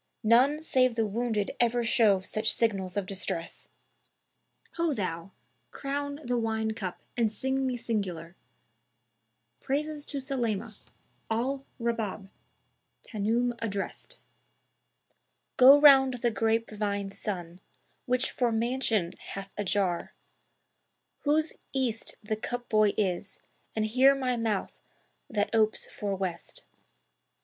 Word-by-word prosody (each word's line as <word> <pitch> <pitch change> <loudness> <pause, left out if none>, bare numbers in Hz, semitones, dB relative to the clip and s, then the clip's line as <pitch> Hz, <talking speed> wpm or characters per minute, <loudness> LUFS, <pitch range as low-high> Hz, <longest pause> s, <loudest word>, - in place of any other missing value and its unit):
None 260 +8 +4
save 255 -5 +2
the 225 -1 +1
wounded 215 -1 -1
ever 240 0 +2
show 215 -4 +4
such 215 +3 +1
signals 195 -4 0
of 200 - 0
distress! 185 -3 -4 1.1
Ho 335 -2 +1
thou! 170 -3 -3 0.4
crown 285 +1 -4
the 245 -1 0
wine 220 -1 -1
cup 195 -5 -6
and 230 -3 +1
sing 265 +4 -1
me 250 -1 -1
singular 185 -8 -3 1.2
Praises 295 +2 -3
to 285 - -5
Sulaymá, 235 -5 -2 0.6
Al 265 +5 -1
Rabáb, 225 -4 -2 0.7
Tan'oum 230 +3 0
addrest;[FN#288] 225 - -4 1.4
Go 270 +3 +9
round 270 -3 +7
the 240 -1 0
grape 225 +1 0
vine 200 -2 -2
sun[FN#289] 180 -4 -5 0.5
which 250 +1 +1
for 245 -2 +1
mansion 225 -5 0
hath 195 0 -8
a 205 - -2
jar; 185 -3 -1 1.0
Whose 310 +2 +1 0.2
East 250 -4 -1
the 215 +1 -1
cup 245 +3 -5
boy 215 -2 +3
is, 195 -1 -1 0.4
and 220 -1 +1
here 260 +5 +5
my 255 -2 0
mouth 225 -4 -1 0.6
that 210 -4 -1
opes 220 -1 +2
for 200 -1 -4
West. 185 -3 -5
225 Hz, 115 wpm, -29 LUFS, 205-255 Hz, 1.4 s, Go